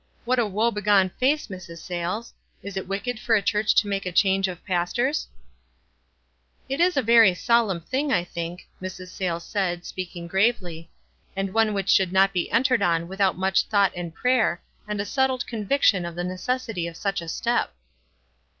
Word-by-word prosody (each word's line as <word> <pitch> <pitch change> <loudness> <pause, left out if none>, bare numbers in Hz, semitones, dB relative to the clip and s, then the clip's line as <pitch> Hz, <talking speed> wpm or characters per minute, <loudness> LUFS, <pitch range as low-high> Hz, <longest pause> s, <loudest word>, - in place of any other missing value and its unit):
What 250 +1 +2
a 230 - +2
woe 215 +4 +1
begone 205 -3 +2
face, 285 +4 +2
Mrs. 185 -4 -9
Sayles! 180 +7 -4 0.3
Is 200 -1 -7
it 190 -1 -4
wicked 205 +5 -3
for 225 0 +2
a 210 - +3
church 210 +2 +1
to 210 - +4
make 195 -1 -2
a - - -2
change 195 +1 +3
of 180 -2 -8
pastors? 205 - 0 0.7
" - - -42
"It 270 +5 -2
is 355 -2 +3
a 270 - +3
very 225 -4 +6
solemn 220 -4 +2
thing, 265 - -2
I 175 - +2
think," 170 0 -6
Mrs. 185 0 -7
Sayles 175 -2 -3
said, 175 -4 -2
speaking 175 -2 -6
gravely; 180 -4 0 0.5
"and 195 0 -2
one 225 -2 +2
which 195 -1 -2
should 190 -2 +4
not 195 +1 +4
be 180 -2 -1
entered 255 +2 +2
on 170 -1 +1
without 190 0 0
much 190 +1 +2
thought 200 -3 +3
and 175 -1 -5
prayer, 220 -5 +1 0.2
and 210 -1 -3
a 200 - -1
settled 265 0 0
conviction 215 -3 +1
of 170 -1 -6
the 175 - -3
ne 180 +1 -3
cessity 225 -4 -2
of 165 - -12
such 195 -3 -2
a 170 - -9
step." 235 - -1
195 Hz, 185 wpm, -24 LUFS, 175-230 Hz, 0.7 s, very